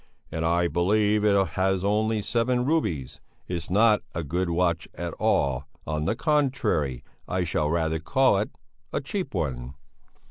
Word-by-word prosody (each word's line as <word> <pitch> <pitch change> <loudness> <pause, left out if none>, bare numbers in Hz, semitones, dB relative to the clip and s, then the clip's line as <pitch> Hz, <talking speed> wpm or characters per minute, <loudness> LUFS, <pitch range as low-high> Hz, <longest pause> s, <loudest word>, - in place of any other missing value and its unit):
"And 80 - -2
I 85 +1 +2
believe 105 +4 +2
it 100 -3 +3
has 95 +2 0
only 110 +1 +1
seven 125 +2 +1
rubies 85 - -1 0.3
it's 85 -2 -4
not 105 +2 +4
a 80 - -2
good 85 +5 -1
watch 85 -1 +1
at 85 -1 -4
all 65 -1 +1 0.2
on 75 -1 -2
the 110 - +1
contrary 125 - 0 0.2
I 90 0 0
should 75 -3 0
rather 80 -1 0
call 100 +7 +3
it 105 - -1 0.4
a - - 0
cheap 180 - -4
one...." 65 -6 -3
90 Hz, 150 wpm, -26 LUFS, 80-110 Hz, 0.4 s, not